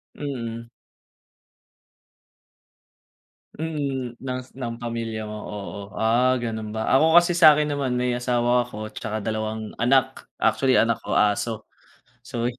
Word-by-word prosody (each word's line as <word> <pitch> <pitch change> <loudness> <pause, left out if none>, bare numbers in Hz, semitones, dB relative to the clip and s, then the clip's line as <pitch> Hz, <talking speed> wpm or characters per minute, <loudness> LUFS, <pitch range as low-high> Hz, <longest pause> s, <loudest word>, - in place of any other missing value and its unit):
Mm. 115 -5 -5 2.9
Mm, 140 -6 -3
ngs 130 0 -6
ng 120 -2 -5
pamilya 115 -2 -4
mo, 105 - -6
oo. 100 0 -7
Ah, 120 +3 +3
ganun 110 -2 -4
ba? 110 0 -2
Ako 160 +4 +4
kasi 175 0 -1
sa 155 -3 +9
akin 150 0 0
naman 140 -3 -1
may 125 0 0
asawa 120 0 +1
ako 110 -3 -7
tsaka 110 0 -5
dalawang 110 0 -4
anak. 130 +2 +2 0.2
Actually 130 -1 +3
anak 115 -1 +3
ko - - -2
aso. 105 +1 +1 0.6
So 120 -2 -4
120 Hz, 125 wpm, -24 LUFS, 110-130 Hz, 2.9 s, sa